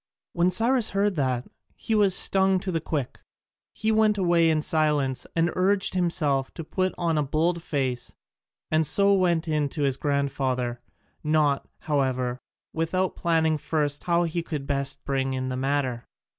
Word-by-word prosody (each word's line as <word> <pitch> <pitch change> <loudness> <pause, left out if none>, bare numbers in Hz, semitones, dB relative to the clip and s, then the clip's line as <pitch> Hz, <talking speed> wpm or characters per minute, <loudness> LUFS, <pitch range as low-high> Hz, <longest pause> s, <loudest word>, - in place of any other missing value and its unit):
When 175 +1 +2
Cyrus 230 +5 +3
heard 205 0 +2
that 130 -3 -1 0.3
he 225 - -3
was 205 -3 +4
stung 190 -1 +3
to 190 - -3
the 165 -2 -1
quick: 145 -5 -4 0.5
he 220 +1 -1
went 215 -1 +3
away 170 -3 +3
in 155 -1 +1
silence 150 -5 0
and 165 0 +2
urged 190 +2 +1
himself 155 -7 0
to 165 - -6
put 185 +4 -2
on 165 -3 0
a - - +1
bold 165 +4 0
face, 130 -7 -3 0.6
and 155 -1 +3
so 200 0 +4
went 175 -3 +1
in 150 -2 0
to 145 +1 -3
his 135 -2 0
grandfather, 135 -4 -1 0.4
not, 150 -2 +1
however, 130 -4 -1 0.3
without 180 +3 -1
planning 160 -2 +1
first 145 -1 -2
how 170 0 +2
he 170 0 -2
could 150 -4 -5
best 140 -1 -2
bring 135 -1 -1
in 130 0 -3
the 130 - -3
matter. 130 -3 -1
155 Hz, 160 wpm, -25 LUFS, 140-180 Hz, 0.6 s, was